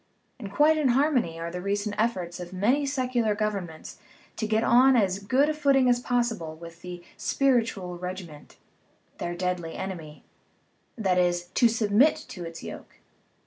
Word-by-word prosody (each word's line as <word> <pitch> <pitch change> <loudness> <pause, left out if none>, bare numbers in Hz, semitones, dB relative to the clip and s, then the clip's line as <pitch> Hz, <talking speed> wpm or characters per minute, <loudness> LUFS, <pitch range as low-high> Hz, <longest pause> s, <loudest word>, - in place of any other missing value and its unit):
Quite 305 +7 +4
in 295 - +2
harmony 255 - +1
are 170 0 -4
the 180 +1 -5
recent 205 +2 -2
efforts 185 -6 -1
of 175 0 -7
many 245 +10 +1
secular 250 -5 0
governments 200 -7 -4 0.4
to 220 - -2
get 220 +1 +1
on 255 +3 +5
as 195 -4 +2
good 255 +8 +2
a 310 - +1
footing 275 -4 +3
as 245 -1 +3
possible 235 -10 -1
with 170 +1 -12
the 175 -1 -8
"spiritual 225 -10 0
regiment," 180 -4 -8 0.6
their 175 0 -3
deadly 180 -2 -3
enemy 165 -6 -7 0.7
that 190 -5 +1
is, 175 0 0
to 240 - +5
submit 225 +5 +3
to 180 - -7
its 165 0 -8
yoke. - - -9
205 Hz, 150 wpm, -26 LUFS, 175-245 Hz, 0.7 s, on